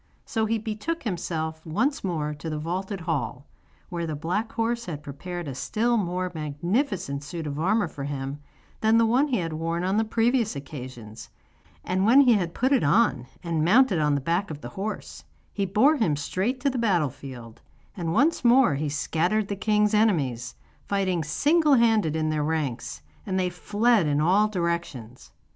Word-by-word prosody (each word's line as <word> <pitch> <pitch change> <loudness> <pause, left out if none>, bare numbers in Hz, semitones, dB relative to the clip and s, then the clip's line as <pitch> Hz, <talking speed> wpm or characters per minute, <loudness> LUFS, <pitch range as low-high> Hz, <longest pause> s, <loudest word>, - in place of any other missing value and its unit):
So 220 -1 -1
he 225 +1 +1
betook 220 +10 -4
himself 160 -6 -3
once 240 - -1
more 155 -5 -2
to 150 +2 -7
the 155 - -3
vaulted 185 +5 -4
hall, 145 -5 -3 0.4
where 170 -2 -3
the 155 - -3
black 180 +9 -2
horse 235 +1 -1
had 150 -3 -6
prepared 175 +4 -6
a 135 - -4
still 230 - 0
more 185 -3 -1
magnificent 160 - -2
suit 160 +2 -6
of 145 0 -4
armour 200 +4 +2
for 140 -3 -7
him 140 0 -4 0.4
than 220 +1 +4
the 230 - +5
one 250 +6 +3
he 260 - 0
had 165 -4 -3
worn 165 +2 -2
on 190 +3 +1
the 220 - +3
previous 225 - +1
occasions, 125 -6 -9 0.5
and 185 +1 0
when 240 +7 +7
he 250 -4 +6
had 175 -5 -1
put 260 +3 +1
it 265 - +3
on, 145 - +2 0.2
and 165 -3 -1
mounted 205 +1 +4
on 150 -1 +2
the 140 - -1
back 170 +7 0
of 150 -2 -7
the 120 - -7
horse, 200 - -6 0.3
he 200 -1 -1
bore 250 +11 +4
him 170 - +1
straight 190 - -2
to 280 0 +2
the 255 - -3
battle 175 - +2
field, 125 -5 -11 0.3
and 170 -5 -3
once 285 - +2
more 245 - +5
he 145 +2 -2
scattered 165 +8 0
the 200 - -1
king's 210 +1 +2
enemies, 140 - +1 0.3
fighting 185 -4 0
single 295 - +3
handed 220 - +3
in 155 -1 0
their 150 -1 0
ranks, 140 - -3 0.2
and 190 -1 0
they 180 -1 0
fled 205 +2 +2
in 145 0 +1
all 190 +7 +4
directions. 170 - -4
175 Hz, 185 wpm, -25 LUFS, 150-220 Hz, 0.5 s, when